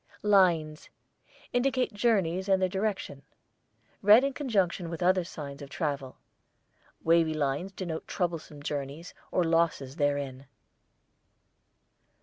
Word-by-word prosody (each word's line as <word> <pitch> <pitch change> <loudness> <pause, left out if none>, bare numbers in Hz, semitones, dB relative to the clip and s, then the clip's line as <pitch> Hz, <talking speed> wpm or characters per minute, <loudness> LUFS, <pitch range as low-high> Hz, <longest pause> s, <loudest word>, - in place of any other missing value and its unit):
LINES 175 -7 +3 0.6
indicate 250 -1 +1
journeys 195 -4 +1
and 190 -1 +4
their 185 - +2
direction, 190 -7 -3 0.8
read 210 +5 +7
in 275 0 0
conjunction 195 - 0
with 170 +1 -4
other 185 0 +3
signs 145 -4 -8
of 140 - -8
travel; 140 -4 -3 0.9
wavy 165 -1 +3
lines 145 +5 -1
denote 175 -4 -5
troublesome 165 -5 -3
journeys 145 +3 -5 0.2
or 180 - +1
losses 165 -4 0
therein. 140 -3 -1
170 Hz, 110 wpm, -29 LUFS, 145-195 Hz, 0.9 s, read